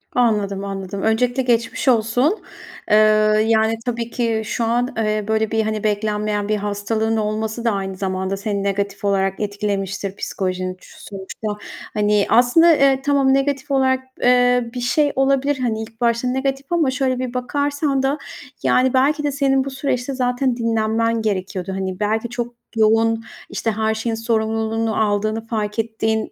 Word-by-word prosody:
Anladım, 210 -5 +1
anladım. 195 0 -5
Öncelikle 245 +4 +1
geçmiş 235 0 0
olsun. 245 - +2 0.5
Eee, - - +7 0.5
yani, 220 0 +3
tabii 235 -1 -2
ki 230 -2 -1
şu 235 - -2
an, 240 +2 0
eee, 215 -1 0
böyle, 220 -1 0
bir, 220 0 +1
hani, 215 -1 -2
beklenmeyen 210 0 -1
bir 215 - +2
hastalığın 210 +2 -1
olması 220 +2 -2
da 230 - +3
aynı 195 -1 -3
zamanda 190 0 -2
seni 200 0 -2
negatif 200 0 -2
olarak 195 -1 +1
etkilemiştir, 200 -2 -3
psikolojini 185 -2 -3
sonuçta. 195 +2 -9 0.5
Hani, 210 -1 +2
aslında, 255 +9 +6
eee, 270 -2 +3
tamam 275 -2 +3
negatif 275 0 0
olarak, 260 -1 +3 0.2
eee, 245 -1 +3
bir 250 - -4
şey 285 +5 +2
olabilir, 275 +1 +2
hani, 220 -3 -1
ilk 225 +1 -10
başta 235 +1 +1
negatif 270 +1 -1
ama 320 -6 +2
şöyle 260 -1 0
bir 255 -1 -3
bakarsan 285 +2 -1
da 275 +2 +1 0.5
yani, 255 0 +3
belki 290 +3 +2
de 290 - 0
senin 270 -1 +2
bu - - -3
süreçte 265 -1 -2
zaten 250 0 0
dinlenmen 230 0 0
gerekiyordu. 190 -2 -2
Hani, 190 0 -4
belki 220 +3 0
çok 240 0 -4 0.2
yoğun, 225 +1 +3 0.3
işte, 225 - -1
her 220 +1 0
şeyin 225 +1 -2
sorumluluğunu 225 0 -1
aldığını 215 +1 0
fark 215 -1 -2
ettiğin 220 0 -1
225 Hz, 155 wpm, -20 LUFS, 210-255 Hz, 0.5 s, Eee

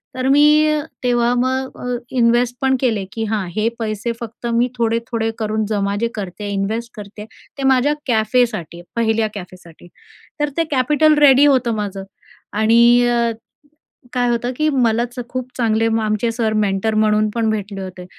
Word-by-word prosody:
तर 255 0 -2
मी 300 +2 +4 0.2
तेव्हा 240 -1 +2
मग 260 +1 -1
अ, 250 0 -2
इन्वेस्ट 240 0 +2
पण 265 0 +2
केले, 220 -7 0
की 225 - -4
हां 210 -3 -2
हे 215 +1 +1
पैसे 220 +1 -2
फक्त 235 0 -9
मी 235 +2 +2
थोडे-थोडे 230 0 -1
करून 215 0 -1
जमा 200 -2 -1
जे 235 - +2
करते 205 0 -6
इन्वेस्ट 220 +4 -3
करते 210 0 -9 0.3
ते 275 - -4
माझ्या 265 +2 +3
कॅफेसाठी, 220 -7 0
पहिल्या 225 -1 +1
कॅफेसाठी 180 -3 -11 0.5
तर 295 0 0
ते 330 - +3
कॅपिटल 300 +3 +3
रेडी 280 -1 +6
होतं 255 -5 +2
माझं 200 -2 -4 0.5
आणि 235 +3 +4
अ, 235 -1 +1 0.8
काय 245 -1 +1
होतं, 240 +1 -1
की 305 +2 +1
मलाच 240 -1 0
खूप 255 0 -5
चांगले 225 -2 +1 0.2
आमचे 215 +2 0
सर 225 -2 -1
मेंटर 210 +1 0
म्हणून 215 0 +2
पण 225 -2 +1
भेटले 205 -2 -4
होते 185 -1 -8
230 Hz, 155 wpm, -19 LUFS, 215-250 Hz, 0.8 s, रेडी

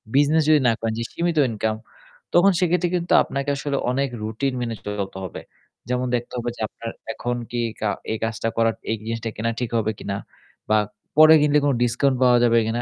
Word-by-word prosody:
Business 150 +2 +4
যদি 155 -1 +6
না 115 - +4
করেন 115 -1 -2
যে - - -1
সীমিত 170 -1 -1
ইনকাম, 110 0 -1 0.6
তখন 195 +3 +6
সেক্ষেত্রে 180 0 +1
কিন্তু 175 0 0
আপনাকে 140 +1 -3
আসলে 140 0 -2
অনেক 135 +1 0
রুটিন 120 +5 -2
মেনে 115 -2 -3
চলতে 100 -2 -4
হবে। 95 - -6 0.5
যেমন 125 0 0
দেখতে 120 +1 -4
হবে 120 0 -2
যে - - -10
আপনার 115 - -8 0.2
এখন 120 +2 -3
কি 120 - -3
এই 110 - -7
কা 105 - +1 0.2
এই 110 - -1
কাজটা 115 0 -1
করা 115 0 +4 0.2
এই - - +1
জিনিসটা 115 0 -4
কেনা 115 +2 -1
ঠিক 120 -2 -2
হবে 110 0 0
কিনা 100 0 -4 0.5
বা 110 - +4 0.4
পরে 155 0 +9
কিনলে 150 0 +4
কোনো 140 - +2
ডিসকাউন্ট 130 +2 +1
পাওয়া 125 -1 +6
যাবে 115 -1 +4
কিনা, 120 +2 -1
120 Hz, 200 wpm, -23 LUFS, 115-145 Hz, 0.6 s, পরে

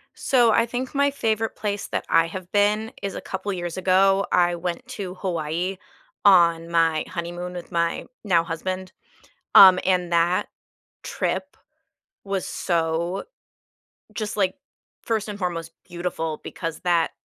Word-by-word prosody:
So 245 -4 +3
I 230 +2 +3
think 245 +2 -4
my 280 0 +3
favorite 225 -4 -1
place 205 -1 -3
that - - -3
I 165 0 +4
have 180 +1 -8
been 210 +2 +2
is 200 -1 -4
a - - -5
couple 195 +1 -4
years 175 -1 -4
ago, 195 +1 +3
I 175 -1 +3
went 175 +7 -4
to 195 -7 -6
Hawaii 175 0 -2 0.5
on 170 -4 +5
my 165 -2 +2
honeymoon 175 +1 -5
with 175 -1 -8
my 170 0 0 0.2
now 175 -6 +3
husband, 185 +3 -4 0.6
um, 185 -2 +10
and 180 -2 +1
that 170 +1 +2 0.6
trip - - -3 0.7
was 195 -2 -2
so 170 +2 -1 0.9
just 215 -1 -4
like 190 -2 +1 0.5
1st 220 -2 -1
and 205 -1 -6
foremost 170 -3 -3 0.2
beautiful 170 -3 -4
because 165 -2 -5
that 170 -2 +2
180 Hz, 140 wpm, -24 LUFS, 170-200 Hz, 0.9 s, um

